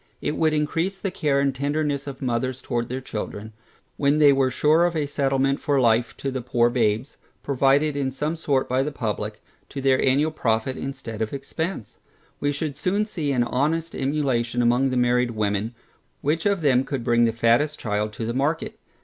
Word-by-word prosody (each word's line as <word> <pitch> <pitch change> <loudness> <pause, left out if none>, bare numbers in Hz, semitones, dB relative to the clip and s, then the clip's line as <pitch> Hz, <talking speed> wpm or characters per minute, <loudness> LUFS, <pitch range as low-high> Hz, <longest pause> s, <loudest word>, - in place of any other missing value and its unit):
It 150 - -2
would 160 -1 +2
encrease 165 +5 -1
the 195 -1 -3
care 150 -6 +1
and 140 -1 +1
tenderness 145 +1 -1
of 135 0 -7
mothers 130 +1 -1
towards 120 -1 -2
their 130 +2 -3
children, 110 -2 -6 0.4
when 145 +1 +2
they 145 -2 +6
were 135 -1 +2
sure 150 +6 +3
of 175 -1 -1
a 150 -2 0
settlement 135 -1 0
for 140 -2 +1
life 115 -1 +2
to 135 - -3
the 130 -1 -3
poor 120 -1 +2
babes, 115 +3 0 0.3
provided 140 +2 +2
in 140 -2 0
some 150 +5 -2
sort 140 -5 0
by 130 +1 +1
the 150 +3 -2
publick, 105 -4 -4 0.3
to 140 - -6
their 135 -1 +2
annual 145 +4 +2
profit 115 -3 0
instead 115 -5 -6
of 110 +3 -2
expence. 140 - -5 0.4
We 145 - 0
should 145 0 -3
soon 190 +7 0
see 160 -9 -3
an 125 -3 +2
honest 155 +7 -1
emulation 130 -4 0
among 120 +3 +3
the 130 - -1
married 125 0 +2
women, 105 +2 -1 0.5
which 160 +6 0
of 200 -3 +1
them 130 -4 +3
could 135 -2 -4
bring 120 -1 +3
the 115 - +2
fattest 120 +7 +2
child 105 0 -1
to 110 - -4
the 115 - -2
market. 145 +6 -1
135 Hz, 190 wpm, -24 LUFS, 120-150 Hz, 0.5 s, they